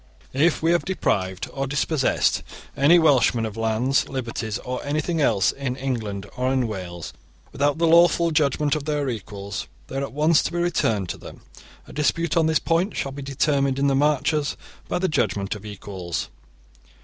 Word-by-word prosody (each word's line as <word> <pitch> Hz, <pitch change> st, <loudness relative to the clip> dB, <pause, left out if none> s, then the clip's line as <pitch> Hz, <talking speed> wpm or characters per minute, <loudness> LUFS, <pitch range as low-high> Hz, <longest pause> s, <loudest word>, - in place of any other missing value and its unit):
* -, -, -28 dB
If 155 Hz, +5 st, +2 dB
we 165 Hz, -, +4 dB
have 175 Hz, -, +2 dB
deprived 95 Hz, -, -1 dB
or 135 Hz, -1 st, -2 dB
dispossessed 145 Hz, +1 st, +1 dB, 0.3 s
any 145 Hz, +6 st, +6 dB
Welshmen 135 Hz, -7 st, +4 dB
of 110 Hz, -1 st, -5 dB
lands, 115 Hz, +4 st, +1 dB
liberties, 115 Hz, -5 st, -3 dB
or 125 Hz, 0 st, -5 dB
anything 155 Hz, +3 st, -1 dB
else 110 Hz, -8 st, +3 dB
in 135 Hz, -2 st, -4 dB
England 115 Hz, -7 st, -3 dB
or 130 Hz, +1 st, 0 dB
in 130 Hz, -3 st, +1 dB
Wales, 90 Hz, -5 st, -6 dB, 0.4 s
without 145 Hz, +1 st, +1 dB
the 165 Hz, -, +2 dB
lawful 170 Hz, 0 st, +5 dB
judgement 150 Hz, -1 st, +2 dB
of 150 Hz, -2 st, -4 dB
their 150 Hz, -2 st, -1 dB
equals, 100 Hz, -3 st, -5 dB, 0.2 s
these 135 Hz, -, -3 dB
are -, -, -2 dB
at 140 Hz, -, -4 dB
once 150 Hz, +3 st, +3 dB
to -, -, -3 dB
be 175 Hz, -, -3 dB
returned 115 Hz, -, +1 dB
to -, -, -5 dB
them. -, -, -11 dB, 0.5 s
A -, -, -12 dB
dispute 155 Hz, +3 st, 0 dB
on 165 Hz, -2 st, +3 dB
this 160 Hz, -1 st, +3 dB
point 175 Hz, +5 st, 0 dB
shall 135 Hz, -, -2 dB
be 140 Hz, +1 st, -7 dB
determined 140 Hz, 0 st, +1 dB
in 140 Hz, -, +1 dB
the 140 Hz, -1 st, +3 dB
Marches 150 Hz, +1 st, +1 dB, 0.3 s
by -, -, -1 dB
the 185 Hz, +1 st, +1 dB
judgement 100 Hz, -, 0 dB
of 105 Hz, 0 st, -9 dB
equals. 95 Hz, -4 st, -5 dB
135 Hz, 185 wpm, -23 LUFS, 115-155 Hz, 0.5 s, any